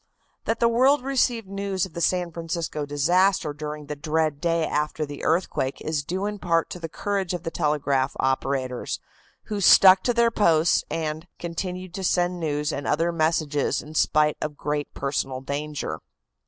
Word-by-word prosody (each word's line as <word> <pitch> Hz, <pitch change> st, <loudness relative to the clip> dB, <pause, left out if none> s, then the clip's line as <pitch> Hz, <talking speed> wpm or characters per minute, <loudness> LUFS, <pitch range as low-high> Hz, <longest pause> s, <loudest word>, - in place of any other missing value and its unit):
That 225 Hz, -, 0 dB
the 235 Hz, -, +4 dB
world 255 Hz, +4 st, +3 dB
received 245 Hz, -5 st, +1 dB
news 195 Hz, -1 st, -2 dB
of 185 Hz, -, -13 dB
the 170 Hz, -, -5 dB
San 180 Hz, 0 st, +1 dB
Francisco 165 Hz, -3 st, -4 dB
disaster 175 Hz, +3 st, +2 dB
during 150 Hz, 0 st, -6 dB
the 150 Hz, -, -5 dB
dread 155 Hz, 0 st, -1 dB
day 165 Hz, -1 st, +1 dB
after 150 Hz, +1 st, -1 dB
the 145 Hz, 0 st, -8 dB
earthquake 165 Hz, -6 st, 0 dB
is 155 Hz, -2 st, -2 dB
due 185 Hz, +6 st, -3 dB
in 210 Hz, 0 st, -3 dB
part 165 Hz, -2 st, +1 dB
to 180 Hz, -, -6 dB
the 165 Hz, -1 st, -5 dB
courage 195 Hz, 0 st, -2 dB
of 175 Hz, -, -6 dB
the 165 Hz, -, -3 dB
telegraph 140 Hz, -3 st, 0 dB
operators, 130 Hz, -1 st, -1 dB, 0.4 s
who 210 Hz, -2 st, -4 dB
stuck 190 Hz, 0 st, +8 dB
to 245 Hz, -, +2 dB
their 235 Hz, 0 st, +4 dB
posts 170 Hz, -5 st, +3 dB
and, 160 Hz, +1 st, -3 dB
continued 180 Hz, +1 st, -5 dB
to 190 Hz, 0 st, -5 dB
send 175 Hz, 0 st, +1 dB
news 150 Hz, -1 st, -1 dB
and 140 Hz, 0 st, -4 dB
other 165 Hz, +3 st, +1 dB
messages 155 Hz, -3 st, 0 dB
in 150 Hz, -, -11 dB
spite 150 Hz, -1 st, +2 dB
of 150 Hz, -1 st, -4 dB
great 150 Hz, 0 st, -2 dB
personal 135 Hz, -1 st, -2 dB
danger. 140 Hz, -, -4 dB
165 Hz, 170 wpm, -25 LUFS, 150-185 Hz, 0.4 s, stuck